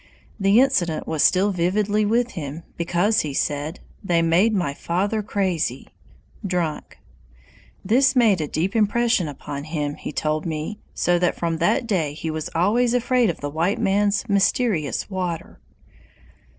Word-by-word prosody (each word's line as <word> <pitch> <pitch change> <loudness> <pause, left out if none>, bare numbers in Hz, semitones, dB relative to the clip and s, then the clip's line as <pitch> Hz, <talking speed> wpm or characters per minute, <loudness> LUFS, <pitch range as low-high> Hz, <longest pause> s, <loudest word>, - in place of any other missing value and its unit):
The 200 +3 +4
incident 190 - +1
was 155 -2 -1
still 195 +2 +3
vividly 205 +4 +1
with 235 +4 +1
him, 155 -1 -6
because, 175 +6 +1
he 145 -3 -2
said, 150 +4 -2 0.2
"They 170 -3 +2
made 175 +7 +3
my 175 -9 -1
father 195 +8 -1
crazy," 190 -5 -2 0.5
[drunk]. 180 -5 -3 0.9
This 260 +7 +3
made 220 -8 +4
a 150 - -2
deep 175 +8 -2
impression 225 -3 +2
upon 145 0 -7
him, 150 -2 -3
he - - -7
told 155 +2 -2
me, 160 +6 -4 0.2
so 175 0 +2
that 180 0 +1
from 165 -1 -1
that 175 +10 +1
day 170 -10 -1
he 160 +1 -4
was 155 -1 -4
always 230 +8 +2
afraid 245 -2 +2
of 170 - -4
the 145 - -3
white 170 +6 0
man's 205 +4 +1
"mysterious 200 - +1
water." 180 - -4
180 Hz, 150 wpm, -22 LUFS, 160-210 Hz, 0.9 s, The